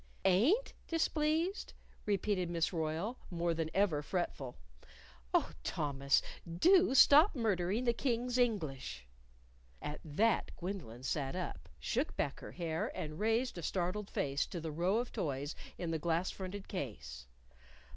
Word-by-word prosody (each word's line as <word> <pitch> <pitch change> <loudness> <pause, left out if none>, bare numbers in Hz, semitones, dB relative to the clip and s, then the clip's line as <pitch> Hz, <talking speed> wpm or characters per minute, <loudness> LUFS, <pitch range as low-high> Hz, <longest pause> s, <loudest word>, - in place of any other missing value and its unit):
"Ain't 245 - +4
displeased?" 325 +3 0 0.3
repeated 195 -3 +1
Miss 170 +1 0
Royle, 165 +9 -2
more 170 -2 0
than 160 -1 -2
ever 190 -7 +2
fretful. 145 -6 -3 0.7
"Oh, - - +2
Thomas, 140 -1 +1 0.3
do 350 - +5
stop 300 +8 +8
murdering 210 -2 +1
the 240 -1 +3
King's 245 0 0
English!" 155 - -1 0.7
At 150 - -5
that 205 +9 +2
Gwendolyn 170 - -5
sat 135 +1 -1
up, 185 -1 -5
shook 260 +7 -1
back 140 - -1
her - - -9
hair, 165 -2 -2
and 155 +1 -5
raised 225 -1 +1
a - - -5
startled 185 +4 -1
face 140 0 0
to 175 - -5
the 160 -1 -4
row 175 +7 +1
of 240 +1 -2
toys 145 -1 -2 0.2
in 170 -2 -3
the 160 - -1
glass 170 +3 0
fronted 190 +1 -6
case. 65 - -6
180 Hz, 135 wpm, -34 LUFS, 155-230 Hz, 0.7 s, stop